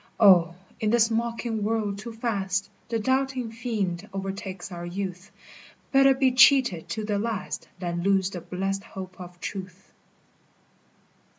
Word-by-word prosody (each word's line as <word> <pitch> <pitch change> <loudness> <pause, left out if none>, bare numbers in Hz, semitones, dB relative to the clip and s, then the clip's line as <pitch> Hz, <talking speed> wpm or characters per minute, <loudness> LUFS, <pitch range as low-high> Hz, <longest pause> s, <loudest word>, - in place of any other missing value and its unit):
O, 180 -5 +6 0.2
in 215 - +1
this 230 0 +4
mocking 230 -1 -1
world 210 -2 -1
too 235 +3 -7
fast 200 -4 -2 0.2
The 230 - 0
doubting 260 0 0
fiend 210 -5 -3
o'ertakes 195 -1 -5
our 175 -1 -6
youth; 180 +1 -5 0.6
Better 270 0 +6
be 265 -1 +3
cheated 250 - +5
to 220 -1 -3
the 205 -1 0
last 220 -2 -3
Than 175 -1 -3
lose 195 0 +2
the 175 - -6
blessed 195 +3 -3
hope 185 -1 -9
of 175 0 -10
truth. 185 0 -7
200 Hz, 135 wpm, -26 LUFS, 185-230 Hz, 0.6 s, O